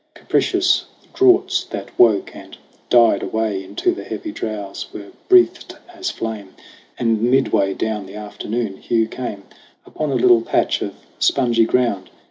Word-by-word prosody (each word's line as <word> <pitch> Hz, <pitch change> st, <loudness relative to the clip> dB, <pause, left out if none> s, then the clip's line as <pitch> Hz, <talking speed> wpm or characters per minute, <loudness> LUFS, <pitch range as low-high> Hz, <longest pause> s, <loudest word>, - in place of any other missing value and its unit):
Capricious -, -, +1 dB, 0.3 s
draughts 380 Hz, -1 st, +3 dB
that -, -, -7 dB
woke 110 Hz, -4 st, +3 dB
and -, -, -12 dB, 0.3 s
died 115 Hz, -4 st, +5 dB
away 110 Hz, -3 st, -2 dB
Into 100 Hz, -, -1 dB
the 355 Hz, -, -7 dB
heavy 320 Hz, -, -6 dB
drowse, 105 Hz, -, -6 dB
were 100 Hz, -1 st, -9 dB, 0.2 s
breatht 370 Hz, -1 st, +4 dB, 0.2 s
as 355 Hz, +1 st, -4 dB
flame. 105 Hz, -4 st, -6 dB, 0.4 s
And 115 Hz, -2 st, 0 dB
midway 120 Hz, -6 st, +2 dB
down 105 Hz, -3 st, -3 dB
the 95 Hz, -, -11 dB
afternoon, 105 Hz, 0 st, -4 dB
Hugh 115 Hz, +1 st, 0 dB
came 110 Hz, -4 st, -6 dB, 0.4 s
Upon 155 Hz, -, -4 dB
a 135 Hz, -, -1 dB
little 120 Hz, -1 st, +5 dB
patch -, -, 0 dB
of -, -, -4 dB, 0.2 s
spongy 120 Hz, -4 st, +3 dB
ground. 115 Hz, -5 st, 0 dB
115 Hz, 140 wpm, -20 LUFS, 105-125 Hz, 0.4 s, died